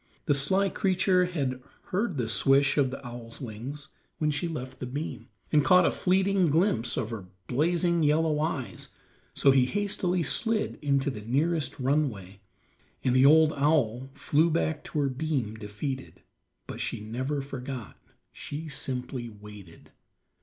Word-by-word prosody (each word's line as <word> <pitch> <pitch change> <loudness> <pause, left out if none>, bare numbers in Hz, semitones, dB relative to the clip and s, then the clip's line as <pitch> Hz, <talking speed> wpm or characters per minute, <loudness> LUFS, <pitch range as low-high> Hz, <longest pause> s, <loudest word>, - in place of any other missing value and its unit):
The 145 - +3
sly 190 +8 +2
creature 185 -2 +2
had 135 -8 -2 0.3
heard 195 -3 0
the 120 -3 -1
swish 135 +4 +3
of 140 -3 +3
the 135 +1 -8
owl's 120 -1 -9
wings 130 +5 -7 0.3
when 150 -1 +1
she 150 +4 -2
left 130 -5 -6
the 125 - -4
beam, 130 -3 -5 0.2
and 150 -2 +4
caught 180 +2 +6
a - - +3
fleeting 190 0 +2
glimpse 145 - +1
of 120 -2 -2
her 105 -5 -6 0.2
blazing 170 - +1
yellow 155 0 +2
eyes, 140 - -2 0.5
so 140 - +5
he 130 -2 +4
hastily 185 -3 0
slid 225 - 0
into 140 -1 +1
the 105 - -7
nearest 145 +5 0
runway, 125 -9 -1 0.6
and 125 -1 +2
the 130 +1 +7 0.3
owl 135 -4 +1
flew 155 +3 +2
back 160 -1 0
to 150 - -2
her 140 - +2
beam 130 -5 -2
defeated; 110 +5 -6 0.4
but - - -7
she - - -2
never 130 +7 -3
forgot, 130 -4 -6 0.4
she 155 +3 -6
simply 125 -3 -4
waited. 105 -5 -13
140 Hz, 145 wpm, -28 LUFS, 125-160 Hz, 0.6 s, the